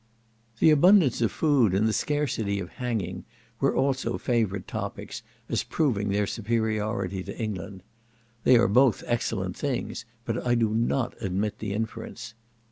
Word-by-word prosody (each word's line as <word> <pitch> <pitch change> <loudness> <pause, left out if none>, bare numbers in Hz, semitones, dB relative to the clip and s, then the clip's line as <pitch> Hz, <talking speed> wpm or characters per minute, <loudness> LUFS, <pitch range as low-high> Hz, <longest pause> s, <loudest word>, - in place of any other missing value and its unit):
The 160 - +5
abundance 160 - +5
of 115 -4 +2
food 130 - +3
and 105 +3 +3
the 110 - +1
scarcity 115 -10 -1
of 90 -2 -5
hanging 120 -6 -3 0.4
were - - +2
also 130 0 0
favourite 110 -7 -1
topics, - - -5 0.3
as - - 0
proving 110 -10 0
their 100 +1 +1
superiority 110 -3 -1
to - - -8
England. 100 -3 -5 0.6
They 125 - +6
are 115 0 +4
both 125 +3 +4
excellent 100 -6 -1
things, 140 -4 -3 0.2
but 115 +1 -2
I 120 -1 +2
do 115 -2 +2
not 120 +3 0
admit 100 +3 -2
the 105 -2 -3
inference. 115 +1 -5
115 Hz, 145 wpm, -27 LUFS, 100-125 Hz, 0.6 s, They